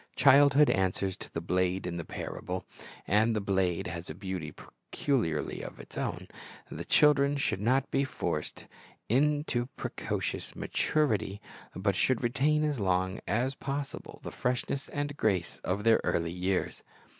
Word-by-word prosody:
Childhood 145 +1 +6
answers 95 0 0
to - - -9
the 85 - -3
blade 90 +2 0
in 85 -1 -3
the. 85 - -3
parable, 90 +3 -5 0.4
and 110 +3 +3
the - - +1
blade 95 -3 0
has 85 0 -5
a 75 - -5
beauty 95 -5 -4
peculiarly 110 - -2
its - - -9
own. - - -3 0.4
The - - -5
children 145 -1 +4
should 120 -8 0
not 130 +5 +2
be 135 - +2
forced 90 - -3 0.4
into 145 +1 +2
a - - -3
precocious 135 - -4
maturity, 110 -9 0 0.4
but 100 0 0
should 130 +5 +2
retain 140 +5 +2
as 150 -4 0
long 95 -1 +1
as 125 +5 +1
possible 140 +1 -5
the - - -5
freshness 125 +2 -2
and 145 0 -3
grace 95 -9 0
of 100 +3 -1
their 115 0 +5
early 85 0 0
years. 90 +1 -1
110 Hz, 145 wpm, -30 LUFS, 90-140 Hz, 0.4 s, Childhood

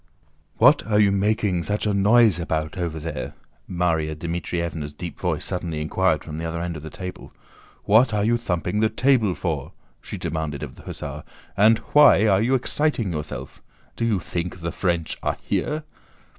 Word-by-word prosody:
"What - - +6
are 105 -1 +3
you 100 -2 +5
making 100 -2 +1
such 105 +6 -2
a 105 - +1
noise 105 -1 +5
about 80 -2 -2
over 85 -3 -3
there?" 75 -1 -5 0.3
Márya 80 -3 0
Dmítrievna's 85 -2 -3
deep 85 +1 -7
voice - - -1
suddenly 85 -4 -3
inquired 75 0 +1
from 75 +1 -7
the - - -4
other 85 0 -3
end 85 0 -3
of 75 - -7
the 80 - -8
table. 90 +3 -8 0.5
"What 115 +4 +5
are 105 -1 0
you 120 +2 +3
thumping 90 -2 -2
the 110 0 +3
table 115 -4 +2
for?" - - -3 0.3
she - - -7
demanded 80 -3 -3
of - - -7
the - - -14
hussar, - - -7 0.3
"and 110 +3 +5 0.2
why 145 -8 +7
are 100 -2 +4
you 125 +4 +2
exciting 130 - 0
yourself? 75 -1 -6 0.3
Do - - -3
you 110 -4 +1
think 90 +1 -4
the 85 0 -3
French 85 -3 -1
are - - -1
here?" 155 +1 -1
90 Hz, 175 wpm, -23 LUFS, 80-110 Hz, 0.5 s, why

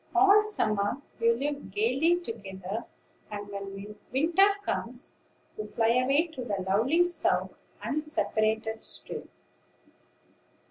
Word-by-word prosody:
All 395 +3 +7
summer 215 - 0 0.2
you 230 0 +4
live 285 -2 -3
gayly 255 - +2
together; 200 - -6 0.4
and, 205 -1 -6
when 200 +1 -7 0.2
winter 330 +9 +5 0.2
comes, 245 -7 -4 0.4
you 210 - -3
fly 225 +1 +1
away 260 +6 +3
to 315 -7 -7
the 200 -5 -2
lovely 245 - +4
South, 350 0 0 0.3
unseparated 220 -7 -1
still." - - -5
230 Hz, 105 wpm, -29 LUFS, 210-305 Hz, 0.4 s, All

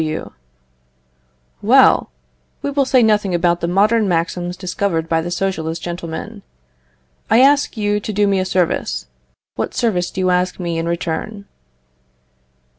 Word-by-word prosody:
W. 155 0 -4 1.3
Well, - - +5 0.5
we 285 - -1
will 280 -1 +1
say 260 -2 +4
nothing 210 -4 +2
about 175 0 +1
the 170 - -1
modern 210 +4 +2
maxims 175 +1 -2
discovered 180 -3 -2
by 165 -1 +1
the 170 - -5
Socialist 170 -3 -3
gentlemen. 175 +5 -6 0.9
I 225 +3 +5
ask 280 -2 +3
you 205 -1 0
to 210 - -5
do 205 0 +2
me 200 -1 +1
a 185 - -1
service; 185 - -1 0.5
what - - -3
service 185 -7 0
do - - -7
you 185 0 +1
ask 180 +1 0
me 170 -2 -2
in 165 - -2
return? 170 +5 -3
185 Hz, 145 wpm, -18 LUFS, 170-210 Hz, 1.3 s, Well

